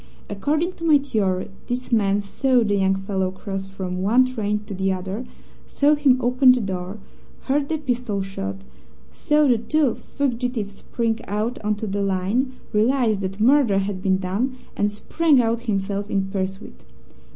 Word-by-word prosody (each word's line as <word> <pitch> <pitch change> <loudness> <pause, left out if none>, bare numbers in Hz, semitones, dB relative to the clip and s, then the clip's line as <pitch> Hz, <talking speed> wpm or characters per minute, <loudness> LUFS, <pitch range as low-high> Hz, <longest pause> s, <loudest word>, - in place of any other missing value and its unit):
According 300 - 0
to - - -9
my 315 -3 +6
theory, 205 -10 -1 0.2
this 250 +1 -4
man 205 -3 +2
saw 250 +4 +2
the 205 -2 0
young 195 0 +2
fellow 190 -1 -1
cross 195 0 -6
from 185 -1 -5
one 235 +7 +4
train 210 -4 -2
to 205 - -7
the 190 0 0
other, 190 +6 -4 0.4
saw 290 +1 +3
him 285 -4 +4
open 255 +1 +5
the 250 - 0
door, 190 -1 -4 0.4
heard 280 +1 0
the 320 - 0
pistol 245 -8 -2
shot, 195 0 -5 0.5
saw 300 -1 +2
the 240 -4 +3
two 285 +1 +1
fugitives 245 -6 -3
spring 225 +2 -2
out 215 +5 -2
on 210 0 +1
to 205 - -5
the 200 0 -2
line, 200 +7 0 0.2
realized 220 -1 +2
that 195 +1 -4
murder 245 -3 +4
had 195 -1 -2
been 190 0 +2
done, 205 +8 -2 0.2
and 205 - +1
sprang 295 +7 +2
out 230 -1 +1
himself 200 0 -1
in 195 -2 -1
pursuit. 190 0 -4
210 Hz, 165 wpm, -23 LUFS, 195-255 Hz, 0.5 s, my